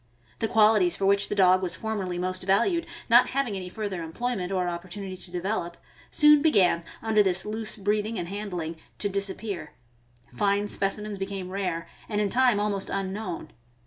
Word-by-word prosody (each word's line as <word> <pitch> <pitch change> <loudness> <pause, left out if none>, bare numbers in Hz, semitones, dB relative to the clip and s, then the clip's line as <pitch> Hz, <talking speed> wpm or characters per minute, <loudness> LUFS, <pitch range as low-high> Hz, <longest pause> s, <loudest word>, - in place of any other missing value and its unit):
The 225 - 0
qualities 210 -5 +4
for 195 - -1
which 200 +1 +3
the - - -1
dog 185 -1 +5
was 175 -3 -2
formerly 195 -3 -3
most 185 +1 -2
valued, 335 - +2 0.2
not 240 +2 +6
having 255 -6 -1
any 185 -1 -5
further 200 -3 -4
employment 185 +3 -3
or 185 -2 0
opportunity 185 +2 -5
to 180 0 -10
develop, 175 -1 -3 0.3
soon 300 -1 +6
began, 190 - +3 0.2
under 220 -1 +4
this 190 -1 +1
loose 215 +1 -4
breeding 210 +2 -1
and 170 - -3
handling, 180 -5 -4 0.2
to 205 - 0
disappear; 195 -3 -3 0.6
fine 200 +5 +1
specimens 200 +1 -2
became 195 -1 -4
rare, 180 -4 -2 0.2
and 210 -2 -1
in 210 -1 +1
time 245 -4 +4
almost 205 -2 -1
unknown. 195 -4 -4
195 Hz, 165 wpm, -27 LUFS, 185-215 Hz, 0.6 s, not